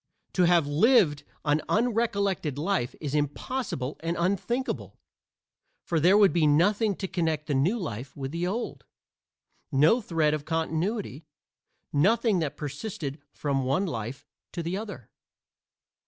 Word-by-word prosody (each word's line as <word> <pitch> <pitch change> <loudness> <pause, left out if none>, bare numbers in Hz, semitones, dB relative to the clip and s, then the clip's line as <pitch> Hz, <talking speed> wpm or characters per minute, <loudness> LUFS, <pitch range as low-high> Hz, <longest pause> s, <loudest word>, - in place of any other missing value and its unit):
To 180 - +4
have 170 -3 +4
lived 150 - +4 0.2
an 150 +1 +2
unrecollected 200 - 0
life 160 -5 -1
is 145 -3 -4
impossible 145 - -2
and 165 +1 -2
unthinkable, 200 +9 -1 0.9
for 165 - 0
there 180 +6 +5
would 200 -3 +5
be 165 -3 +3
nothing 200 +8 +3
to 190 - -4
connect 160 -4 -1
the 150 - -1
new 155 - +2
life 130 - -6
with 135 -1 -4
the 170 +2 -2
old 225 +6 -3 0.9
no 155 - +4
thread 160 -6 +1
of 155 -2 -2
continuity 165 - -2 0.7
nothing 210 - +3
that 155 -4 -3
persisted 150 0 -5
from 140 -2 -2
the 130 - -2
one 140 +10 +1
life 120 - -5 0.3
to 170 - -3
the 170 +3 -2
other. 200 - -7
165 Hz, 140 wpm, -27 LUFS, 145-200 Hz, 0.9 s, there